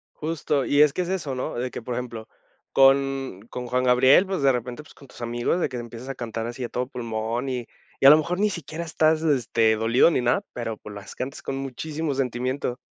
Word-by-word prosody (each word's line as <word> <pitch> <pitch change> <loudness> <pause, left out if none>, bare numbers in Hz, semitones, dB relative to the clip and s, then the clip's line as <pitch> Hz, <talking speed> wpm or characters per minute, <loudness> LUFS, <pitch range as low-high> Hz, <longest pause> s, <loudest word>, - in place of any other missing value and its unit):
Justo. 150 -3 -1
Y 145 +1 +3
es 150 -2 +5
que 180 - -1
es 175 - -3
eso, 155 -9 -2
¿no? 125 - -3
De 125 +1 -3
que, - - -6
por 120 +1 -4
ejemplo, 115 -3 -6 0.5
con 135 -5 +3
con 125 0 -6
Juan 125 +1 0
Gabriel, 130 +8 +5
pues 190 -5 -2
de 135 -1 +5
repente, 125 +3 -4
pues - - -17
con 140 - -16
tus 120 - -14
amigos 120 +8 -1
de - - +1
que 125 - -5
empiezas 120 +2 -8
a 135 - -4
cantar 115 -2 -4
así 120 +1 -6
a 120 - -4
todo 125 0 -2
pulmón 115 0 -3
y 125 -2 -3 0.4
y - - +9
a - - +12
lo 150 - +9
mejor 175 +4 -2
ni 210 0 +3
siquiera 170 -2 -5
estás, 160 -1 +2
este, 115 -7 +2
dolido 115 +8 +4
ni 140 - +1
nada, 120 0 +1
pero, 115 -2 -4
pues, 105 -1 -10
las 100 -1 -9
cantas 130 +2 -6
con 135 - -3
muchísimo 145 +2 -4
sentimiento. 125 0 -2
130 Hz, 230 wpm, -24 LUFS, 120-145 Hz, 0.5 s, a